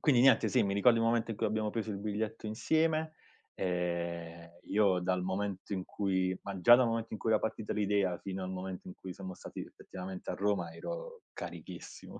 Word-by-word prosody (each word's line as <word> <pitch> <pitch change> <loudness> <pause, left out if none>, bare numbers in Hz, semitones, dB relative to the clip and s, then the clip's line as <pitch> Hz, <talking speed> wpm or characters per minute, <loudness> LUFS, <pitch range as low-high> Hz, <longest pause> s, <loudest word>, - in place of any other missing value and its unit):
quindi 130 -6 +5
niente 135 +1 +6
sì, 125 -3 +4
ricordo 100 +4 +4
il 115 - +2
momento 115 0 +2
in 110 - -3
cui - - +2
abbiamo 110 0 0
preso 110 -1 -2
il 100 - -3
biglietto 110 +1 -3
insieme, 155 +7 +1 0.4
ehm, 85 -2 -2
io 100 -3 +3
dal 90 0 0
momento 95 +1 -2
in 95 -2 -1
cui 95 -2 0
ma 100 -2 -5
già 120 +7 +9
dal 125 - +4
momento 115 -1 -1
in 110 - -3
cui 110 - 0
era 110 - +5
partita 110 -1 -2
l'idea 100 -4 +1
fino 95 -1 -5
al 90 - -4
momento 95 0 -5
in - - -8
cui 95 -1 -8
siamo 95 -2 -7
stati - - -8
effettivamente 95 0 -7
a - - -1
Roma 100 0 0
ero - - -6
carichissimo. - - -8
100 Hz, 195 wpm, -33 LUFS, 95-115 Hz, 0.4 s, già